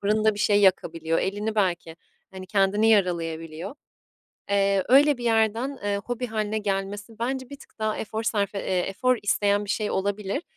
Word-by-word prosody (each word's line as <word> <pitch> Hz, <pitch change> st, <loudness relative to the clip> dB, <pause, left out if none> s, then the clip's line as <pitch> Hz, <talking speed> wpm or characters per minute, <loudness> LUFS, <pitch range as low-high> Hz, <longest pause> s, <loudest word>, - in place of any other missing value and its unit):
fırında 215 Hz, +1 st, +2 dB
bir -, -, -9 dB
şey 205 Hz, 0 st, +3 dB
yakabiliyor. 165 Hz, -4 st, +2 dB
Elini 205 Hz, +3 st, -2 dB
belki, 175 Hz, -5 st, -1 dB, 0.3 s
hani, 190 Hz, -1 st, -9 dB
kendini 200 Hz, +2 st, +2 dB
yaralayabiliyor. 170 Hz, -, -1 dB, 0.8 s
Eee, 200 Hz, -1 st, +2 dB
öyle 285 Hz, +3 st, +6 dB
bir 240 Hz, -, -6 dB
yerden, 230 Hz, +4 st, +1 dB
eee, 205 Hz, 0 st, 0 dB
hobi 245 Hz, +1 st, -3 dB
hâline 215 Hz, -1 st, -2 dB
gelmesi 205 Hz, +2 st, -4 dB
bence 260 Hz, +2 st, -3 dB
bir 280 Hz, -, -8 dB
tık -, -, -19 dB
daha 215 Hz, -1 st, -1 dB
efor 220 Hz, +1 st, -4 dB
sarfe 205 Hz, -3 st, -1 dB
eee, 185 Hz, -1 st, -1 dB
efor 205 Hz, +8 st, +1 dB
isteyen 205 Hz, 0 st, +1 dB
bir 200 Hz, -, -5 dB
şey 210 Hz, 0 st, -1 dB
olabilir. 200 Hz, -, -2 dB
205 Hz, 165 wpm, -25 LUFS, 195-220 Hz, 0.8 s, öyle